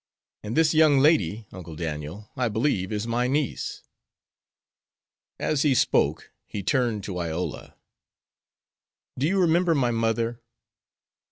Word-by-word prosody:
And 105 Hz, +5 st, -4 dB
this 160 Hz, -1 st, +4 dB
young 155 Hz, -2 st, +5 dB
lady, 115 Hz, -, +3 dB
Uncle 85 Hz, -4 st, -9 dB
Daniel, 80 Hz, +6 st, -6 dB
I 125 Hz, -2 st, 0 dB
believe 110 Hz, -4 st, 0 dB
is 105 Hz, 0 st, -2 dB
my 120 Hz, +1 st, 0 dB
niece." 140 Hz, 0 st, -2 dB, 1.5 s
As 150 Hz, -3 st, 0 dB
he 145 Hz, -3 st, +3 dB
spoke -, -, +1 dB, 0.2 s
he 100 Hz, -, -5 dB
turned 120 Hz, -3 st, 0 dB
to 95 Hz, -3 st, -4 dB
Iola. 85 Hz, +1 st, -4 dB, 1.4 s
"Do 140 Hz, -, +2 dB
you 195 Hz, +3 st, +1 dB
remember 170 Hz, -1 st, +3 dB
my 125 Hz, -4 st, +2 dB
mother?" 115 Hz, +1 st, -1 dB
115 Hz, 120 wpm, -25 LUFS, 100-145 Hz, 1.5 s, young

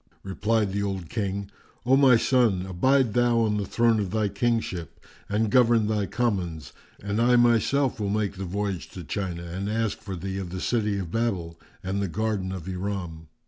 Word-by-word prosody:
Replied 105 Hz, +2 st, 0 dB
the 100 Hz, -, -1 dB
old 95 Hz, -5 st, -3 dB
King, 100 Hz, -2 st, -3 dB, 0.3 s
"O 130 Hz, +2 st, +5 dB
my 135 Hz, -3 st, +6 dB
son, 115 Hz, -7 st, +2 dB
abide 120 Hz, +6 st, +2 dB
thou 120 Hz, -1 st, +3 dB
on 105 Hz, -2 st, +1 dB
the 100 Hz, -, -2 dB
throne 115 Hz, -2 st, +2 dB
of 100 Hz, -3 st, -2 dB
thy 105 Hz, +1 st, 0 dB
kingship 100 Hz, -5 st, -2 dB, 0.3 s
and 105 Hz, +1 st, 0 dB
govern 120 Hz, -3 st, +4 dB
thy 105 Hz, -2 st, 0 dB
commons, 90 Hz, -, -2 dB, 0.3 s
and 100 Hz, +2 st, -1 dB
I 125 Hz, +1 st, +5 dB
myself 120 Hz, +2 st, +3 dB
will 100 Hz, -2 st, -1 dB
make 105 Hz, -1 st, 0 dB
the 95 Hz, -, -4 dB
voyage 100 Hz, -1 st, -3 dB
to 90 Hz, -, -7 dB
China 85 Hz, 0 st, -4 dB
and 95 Hz, +4 st, -4 dB
ask 110 Hz, -1 st, -1 dB
for 95 Hz, -2 st, -6 dB
thee 95 Hz, +2 st, -4 dB
of 95 Hz, -2 st, -5 dB
the 95 Hz, +1 st, -5 dB
city 105 Hz, -1 st, 0 dB
of 90 Hz, -4 st, -5 dB
Babel 90 Hz, -8 st, -2 dB, 0.2 s
and 95 Hz, +2 st, -2 dB
the 100 Hz, -, 0 dB
garden 100 Hz, 0 st, -2 dB
of 95 Hz, -2 st, -6 dB
Iram." 90 Hz, -4 st, -4 dB
100 Hz, 185 wpm, -26 LUFS, 95-115 Hz, 0.3 s, my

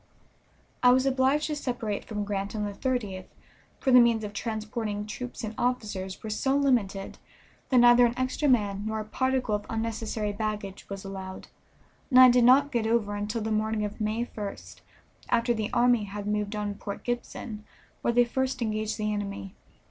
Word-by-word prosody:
I 250 Hz, -, +6 dB
was 260 Hz, +1 st, +3 dB
obliged 270 Hz, +3 st, +2 dB
to 305 Hz, -, -2 dB
separate 240 Hz, -7 st, -3 dB
from 210 Hz, -2 st, -3 dB
Grant 200 Hz, 0 st, -3 dB
on 210 Hz, -1 st, -1 dB
the 205 Hz, -, -4 dB
30th, 205 Hz, -6 st, -3 dB, 0.5 s
for 265 Hz, -, +1 dB
the 250 Hz, -, +9 dB
means 235 Hz, -2 st, +4 dB
for 205 Hz, -, -6 dB
transporting 215 Hz, 0 st, -3 dB
troops 245 Hz, +3 st, -7 dB
and 220 Hz, 0 st, -4 dB
officers 210 Hz, -7 st, -2 dB
were 220 Hz, -, -5 dB
so 265 Hz, +6 st, +1 dB
limited 225 Hz, -9 st, 0 dB, 0.5 s
that 255 Hz, -, +3 dB
neither 240 Hz, 0 st, +7 dB
an 235 Hz, -, -5 dB
extra 255 Hz, +3 st, 0 dB
man 205 Hz, -5 st, +2 dB
nor 220 Hz, 0 st, -2 dB
a 215 Hz, -, -4 dB
particle 260 Hz, 0 st, 0 dB
of 205 Hz, 0 st, -1 dB
unnecessary 220 Hz, -2 st, -2 dB
baggage 210 Hz, -2 st, -4 dB
was 195 Hz, 0 st, -6 dB
allowed, 190 Hz, -1 st, -7 dB, 0.6 s
and 255 Hz, -2 st, +6 dB
I 255 Hz, -1 st, +10 dB
did 245 Hz, -1 st, +4 dB
not 275 Hz, +3 st, +6 dB
get 230 Hz, -3 st, 0 dB
over 225 Hz, -3 st, +1 dB
until 210 Hz, +3 st, -3 dB
the 220 Hz, -, -2 dB
morning 215 Hz, 0 st, 0 dB
of 210 Hz, +2 st, -6 dB
May 215 Hz, +3 st, 0 dB
1st, 205 Hz, -4 st, -8 dB, 0.5 s
after 235 Hz, 0 st, +2 dB
the 220 Hz, -2 st, -3 dB
army 240 Hz, -3 st, +3 dB
had 205 Hz, 0 st, -6 dB
moved 210 Hz, 0 st, -1 dB
on 205 Hz, -1 st, -2 dB
Port 200 Hz, 0 st, -7 dB
Gibson, 240 Hz, -3 st, -4 dB, 0.4 s
where -, -, +1 dB
they 245 Hz, +1 st, +4 dB
first 260 Hz, +1 st, -1 dB
engaged 215 Hz, -1 st, -2 dB
the 215 Hz, -1 st, -1 dB
enemy. 200 Hz, -1 st, -5 dB
220 Hz, 180 wpm, -27 LUFS, 205-245 Hz, 0.6 s, I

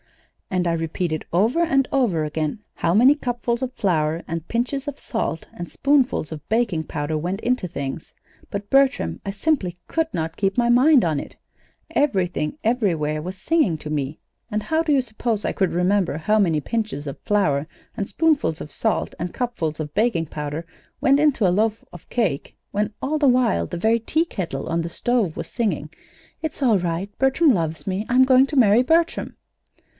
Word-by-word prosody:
"And 180 Hz, -2 st, 0 dB
I 170 Hz, -, +1 dB
repeated 165 Hz, 0 st, -2 dB
over 220 Hz, -, +2 dB
and 275 Hz, -6 st, +2 dB
over 205 Hz, -, +1 dB
again 155 Hz, +5 st, -2 dB
how 170 Hz, -, 0 dB
many 250 Hz, +6 st, +7 dB
cupfuls 240 Hz, -3 st, -2 dB
of 260 Hz, -1 st, -2 dB
flour 165 Hz, -6 st, 0 dB
and 165 Hz, 0 st, -4 dB
pinches 260 Hz, +4 st, -2 dB
of 290 Hz, -1 st, -5 dB
salt 195 Hz, -8 st, -3 dB
and 175 Hz, -, -7 dB
spoonfuls 275 Hz, -, +1 dB
of 155 Hz, -2 st, -7 dB
baking 215 Hz, -8 st, +1 dB
powder 150 Hz, +1 st, -3 dB
went 180 Hz, +5 st, -2 dB
into 250 Hz, -6 st, 0 dB
things; 140 Hz, -2 st, -5 dB, 0.4 s
but, 200 Hz, 0 st, -5 dB
Bertram, 265 Hz, -, +2 dB
I -, -, -3 dB
simply 200 Hz, -, -1 dB
could 325 Hz, -1 st, 0 dB
not 165 Hz, 0 st, -3 dB
keep 195 Hz, +1 st, 0 dB
my 240 Hz, -1 st, +3 dB
mind 255 Hz, -, +5 dB
on 155 Hz, -4 st, 0 dB
it. -, -, -9 dB, 0.5 s
Everything, 185 Hz, -, 0 dB
everywhere 170 Hz, -11 st, 0 dB
was 185 Hz, +4 st, -6 dB
singing 295 Hz, -, +1 dB
to 150 Hz, -, -8 dB
me. 145 Hz, 0 st, -2 dB, 0.3 s
And 210 Hz, -1 st, -2 dB
how 320 Hz, 0 st, +1 dB
do 315 Hz, -, 0 dB
you 275 Hz, -2 st, +4 dB
suppose 225 Hz, -2 st, -2 dB
I -, -, 0 dB
could 190 Hz, -3 st, +1 dB
remember 180 Hz, -1 st, +1 dB
how 215 Hz, +7 st, +2 dB
many 165 Hz, -6 st, +2 dB
pinches 215 Hz, -7 st, -3 dB
of 140 Hz, -, -6 dB
flour 155 Hz, -9 st, +1 dB, 0.3 s
and 200 Hz, -, -3 dB
spoonfuls 305 Hz, -, +1 dB
of 150 Hz, -, -8 dB
salt -, -, 0 dB
and 175 Hz, +1 st, -4 dB
cupfuls 175 Hz, -12 st, -2 dB
of 150 Hz, -1 st, -5 dB
baking 210 Hz, -7 st, +1 dB
powder 150 Hz, +2 st, -5 dB, 0.3 s
went 275 Hz, +1 st, +4 dB
into 285 Hz, -9 st, +3 dB
a 175 Hz, -, +2 dB
loaf 220 Hz, +3 st, 0 dB
of 175 Hz, -, -13 dB
cake 190 Hz, -, -1 dB
when 210 Hz, +1 st, -1 dB
all 305 Hz, +3 st, 0 dB
the 290 Hz, -, +4 dB
while 245 Hz, -, +3 dB
the -, -, -5 dB
very 225 Hz, +6 st, +2 dB
teakettle 210 Hz, -, -2 dB
on 165 Hz, +1 st, 0 dB
the 165 Hz, -, -4 dB
stove 220 Hz, -2 st, 0 dB
was -, -, -4 dB
singing: 180 Hz, -, -2 dB, 0.5 s
'It's 315 Hz, -2 st, -5 dB
all 230 Hz, -7 st, +4 dB
right 175 Hz, +3 st, -3 dB
Bertram 270 Hz, +2 st, +4 dB
loves 160 Hz, -5 st, -2 dB
me 195 Hz, +3 st, -2 dB
I'm 255 Hz, +1 st, +5 dB
going 260 Hz, +1 st, +5 dB
to 295 Hz, -, -5 dB
marry 225 Hz, -2 st, +6 dB
Bertram!'?" 330 Hz, +6 st, +1 dB
200 Hz, 185 wpm, -22 LUFS, 165-250 Hz, 0.5 s, many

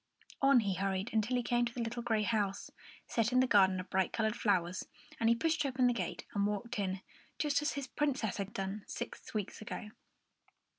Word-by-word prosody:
On 275 Hz, -3 st, +6 dB
he 200 Hz, -3 st, 0 dB
hurried 190 Hz, +3 st, -1 dB
until 225 Hz, +3 st, +2 dB
he 245 Hz, -, 0 dB
came 240 Hz, 0 st, +2 dB
to 235 Hz, -, -4 dB
the -, -, -4 dB
little 230 Hz, +1 st, -3 dB
grey 225 Hz, -3 st, +1 dB
house, 205 Hz, -3 st, -1 dB, 0.3 s
set 230 Hz, 0 st, +1 dB
in 250 Hz, -, +3 dB
its 255 Hz, -, -2 dB
garden 190 Hz, -2 st, +5 dB
of 185 Hz, -, -7 dB
bright 190 Hz, -1 st, +2 dB
coloured 220 Hz, 0 st, 0 dB
flowers; 185 Hz, -5 st, 0 dB, 0.3 s
and 225 Hz, -, +3 dB
he 235 Hz, -, +5 dB
pushed 315 Hz, +4 st, +1 dB
open 260 Hz, -2 st, +1 dB
the 245 Hz, -, +4 dB
gate 235 Hz, -, -3 dB
and 200 Hz, 0 st, +2 dB
walked 210 Hz, +3 st, -3 dB
in, 190 Hz, -1 st, -1 dB, 0.4 s
just 290 Hz, -1 st, +1 dB
as 295 Hz, -, 0 dB
his 280 Hz, -1 st, -3 dB
Princess 265 Hz, -7 st, -1 dB
had 200 Hz, -1 st, -3 dB
done 195 Hz, +1 st, -4 dB
six 240 Hz, -1 st, -6 dB
weeks 210 Hz, 0 st, -3 dB
ago. 210 Hz, 0 st, -6 dB
220 Hz, 205 wpm, -34 LUFS, 195-245 Hz, 0.4 s, On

